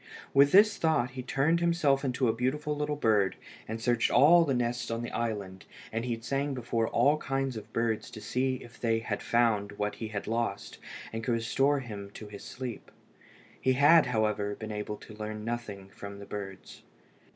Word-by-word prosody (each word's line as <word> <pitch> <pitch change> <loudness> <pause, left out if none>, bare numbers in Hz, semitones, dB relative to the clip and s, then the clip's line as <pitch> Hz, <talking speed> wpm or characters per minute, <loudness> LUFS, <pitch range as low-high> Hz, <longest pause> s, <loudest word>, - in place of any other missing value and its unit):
With 140 +1 +6
this 205 +2 +6
thought 155 -7 +1
he 130 0 -6
turned 145 +6 +1
himself 165 -5 +2
into 130 -1 0
a 110 - +3
beautiful 150 +6 -1
little 150 0 -1
bird, 105 -8 +2 0.3
and 110 +1 -4
searched 120 0 +2
all 165 +7 +7
the 140 -5 0
nests 120 0 -1
in 115 +1 -2
the 120 - -5
island, 100 -5 -3 0.3
and 115 +2 -2
he'd 115 -2 -3
sang 140 +2 -1
before 115 -2 -1
all 145 +2 +3
kinds 135 -3 -2
of 110 0 -8
birds 115 -1 -1
to 120 -3 -9
see 130 +4 0
if 120 - -15
they 115 -1 +1
had 110 -2 -3
found 110 -4 +1
what 105 0 -2
he 110 - -4
had 105 -2 -5
lost, 115 -3 -3 0.3
and 115 0 -4
could 120 - 0
restore 135 +5 +1
to - - -10
him 100 -3 -7 0.2
his 100 - -9
sleep. 125 -3 -7 0.7
He 130 - +3
had, 145 +3 +6
however, 105 -3 0
been 110 0 -7
able 105 0 -4
to 110 - -13
learn 105 0 -6
nothing 110 -5 -5
from 100 0 -9
the 100 - -9
birds. 95 -2 -8
120 Hz, 190 wpm, -29 LUFS, 105-135 Hz, 0.7 s, all